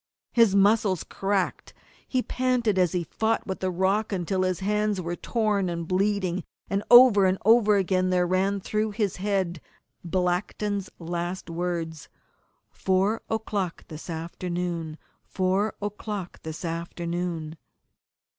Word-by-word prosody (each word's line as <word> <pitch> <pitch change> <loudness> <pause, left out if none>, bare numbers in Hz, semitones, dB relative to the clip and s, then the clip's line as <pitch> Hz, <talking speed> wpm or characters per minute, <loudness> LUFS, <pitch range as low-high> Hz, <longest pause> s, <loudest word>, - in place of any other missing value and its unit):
His 230 -5 +4
muscles 200 -2 +3
cracked, 195 -1 -2 0.3
he 255 -2 0
panted 245 -6 +1
as 180 -3 +2
he 180 -1 0
fought 220 +7 -1
with 190 - -4
the 185 - -1
rock 190 +4 +1
until 185 0 -1
his 185 0 0
hands 210 0 0
were 175 -1 -3
torn 210 -3 0
and 170 -1 -4
bleeding, 190 -1 0 0.3
and 195 0 +1
over 240 -6 +8
and 185 +1 +1
over 220 -2 +6
again 185 -1 +1
there 180 -1 +2
ran 190 +2 +1
through 215 +2 -1
his 205 -5 0
head 190 -4 -1 0.4
Blackton's 185 +3 -1
last 175 +1 -4
words 165 -2 -3 0.6
_Four 190 +4 +1
o'clock 205 -5 -2
this 155 +2 -9
afternoon! 170 -1 -4 0.3
Four 190 +3 0
o'clock 205 -2 -5
this 160 +2 -6
afternoon! 170 -1 -3
185 Hz, 125 wpm, -26 LUFS, 175-205 Hz, 0.6 s, over